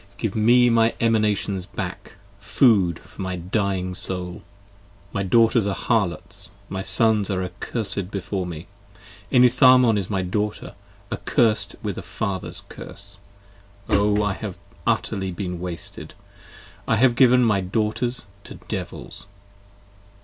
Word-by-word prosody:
Give 110 -2 -3
me 120 +3 +5
my 115 0 +3
Emanations 105 -4 +1
back, - - -6 0.3
food 100 - +3
for - - -12
my 95 -1 -2
dying 95 0 -1
soul: 90 0 -3 0.7
My 100 - -1
daughters 115 +2 +3
are 100 - -1
harlots: 105 -7 -1 0.2
my 95 0 -3
sons 110 0 +2
are 95 -2 -1
accursed 95 +1 -4
before 95 -1 -3
me. 85 0 -7 0.6
15 125 -2 +5
Enitharmon 125 -2 +6
is 95 - -4
my 95 -3 -1
daughter: 105 +3 -3 0.4
accursed 110 -3 +1
with 100 -4 -3
a - - -6
father's 95 +3 -3
curse: 100 0 -10 0.7
O! 105 +1 +3
I 105 -1 0
have 100 -2 -6 0.3
utterly 95 -1 0
been 90 -1 -4
wasted: 90 -1 -7 0.7
I 115 - +3
have 120 +2 +4
given 125 -1 +5
my 105 -4 +2
daughters 110 +5 -1 0.2
to - - -9
devils. - - -6
100 Hz, 130 wpm, -23 LUFS, 95-115 Hz, 0.7 s, Enitharmon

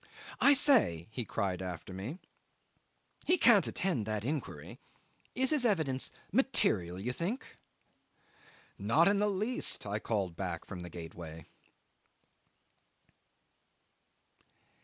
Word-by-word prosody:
"I 285 - +6
say," 250 - +5
he 120 0 -4
cried 95 -5 -2
after 90 0 -7
me; 105 - -6 1.1
"he 360 - +5
can't 235 - +5
attend 135 - -2
that 105 0 -3
inquiry. 145 +1 -5 0.6
Is 260 +2 +1
his 300 -4 +1
evidence 160 - 0 0.2
material, 100 - +1
you 120 +6 -3
think?" 190 - -5 1.2
'"Not 115 +12 +3
in 200 0 +3
the 210 0 +2
least," 210 - 0
I 105 +1 -2
called 100 -6 -2
back - - -5
from 90 -2 -8
the 90 - -8
gateway. 80 -1 -9
120 Hz, 110 wpm, -32 LUFS, -, 1.2 s, I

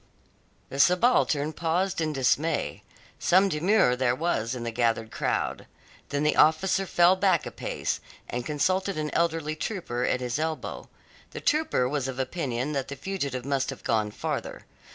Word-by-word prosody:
The 135 - -6
subaltern 175 - +3
paused 170 +3 0
in 155 -1 0
dismay. 145 +3 0 0.4
Some 190 +2 +4
demur 170 - +3
there 125 -1 +1
was 130 -7 -1
in 120 - -5
the 115 - -3
gathered 115 -1 0
crowd. - - -2 0.4
Then 145 0 -1
the 150 - +2
officer 190 +5 +3
fell 175 +2 +5
back 185 -3 +2
a - - -5
pace, - - -3 0.3
and 120 0 -3
consulted 185 +7 0
an 150 -1 -2
elderly 165 -2 0
trooper 155 - -3
at 125 - +1
his 125 +2 -2
elbow. 160 0 -4 0.4
The - - -6
trooper 300 - +1
was 140 -1 -1
of 130 -1 -5
opinion 130 -1 -2
that 135 -2 -2
the 140 - -6
fugitive 140 -6 -4
must 135 -1 0
have 135 - -7
gone 110 -2 +1
farther. - - -4
150 Hz, 160 wpm, -27 LUFS, 125-175 Hz, 0.4 s, fell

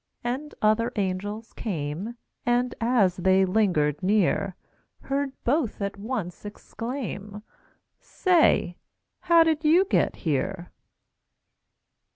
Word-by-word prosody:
And 260 +5 -4
other 225 +3 +3
angels 205 +3 -3
came, 180 +4 -4 0.3
And, 245 +1 +1
as 225 -6 +2
they 190 +1 +3
lingered 180 -8 +1
near, 195 -1 +1 0.5
Heard 275 0 -2
both 265 -2 0
at 200 -1 -3
once 200 -4 -5
exclaim: 210 -1 -6 0.6
"Say, 335 - +2 0.4
how 335 -1 +5
did 320 -1 0
you 335 +5 +5
get 395 - +1
here?" 170 +4 -1
215 Hz, 100 wpm, -26 LUFS, 185-250 Hz, 0.6 s, how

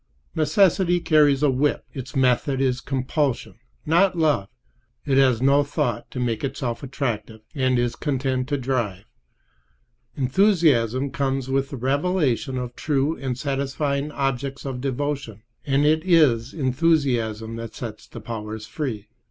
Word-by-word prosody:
Necessity 180 +1 +3
carries 150 -4 +3
a 145 - +4
whip. 140 +3 0
Its 135 +2 -7
method 130 +1 +2
is 130 -2 +1
compulsion, 135 0 -2 0.3
not 175 +3 +3
love. 150 -12 +2 0.6
It 135 -2 +3
has 130 -3 +3
no 140 +2 +5
thought 145 +1 -2
to 125 - -6
make 115 -3 -1
itself 130 -3 -3
attractive; 115 -5 -4
it 130 -3 +1
is 120 -1 0
content 130 -2 -1
to 145 - 0
drive. 120 -7 -2 1.1
Enthusiasm 140 - +2
comes 135 -1 -1
with 135 0 0
the 140 - -6
revelation 140 -1 0
of 125 -1 -5
true 145 +1 0
and 130 -2 -4
satisfying 140 +1 -2
objects 135 0 -2
of 130 -2 -4
devotion; 135 -5 -3 0.2
and 140 +1 +2
it 155 +1 +3
is 140 -10 +3
enthusiasm 130 -7 0
that 115 0 -7
sets 110 -3 -7
the - - -9
powers 110 -1 -6
free. 110 -7 -4
135 Hz, 135 wpm, -23 LUFS, 125-145 Hz, 1.1 s, no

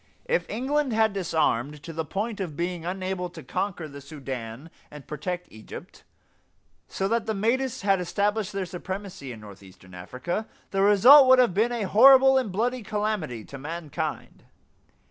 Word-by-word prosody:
If - - -1
England 265 +3 -1
had 220 -1 +2
disarmed 150 -6 -1
to 165 - -8
the 160 +1 -2
point 205 +7 -4
of 165 -7 -5
being 175 -1 -3
unable 185 -1 -3
to 165 -3 -11
conquer 175 +3 -3
the 140 -1 -11
Sudan 135 -1 -7 0.2
and 150 -2 -12
protect 175 +4 -5
Egypt, 110 0 -11 0.8
so 195 - -2
that 230 +1 -1
the 220 - -1
Mahdists 240 +5 0
had 195 -2 +2
established 205 +3 -1
their 195 -1 -3
supremacy 185 -5 -7
in 115 - -9
northeastern 95 -3 -14
Africa, 130 - -5 0.2
the 195 - 0
result 245 +8 +8
would 260 0 +7
have 245 -6 +4
been 220 +5 +2
a 235 -3 -2
horrible 265 +6 +7
and 235 -6 -3
bloody 240 +6 -1
calamity 210 - -3
to 140 - -10
mankind. 155 +1 -5
190 Hz, 160 wpm, -26 LUFS, 150-220 Hz, 0.8 s, result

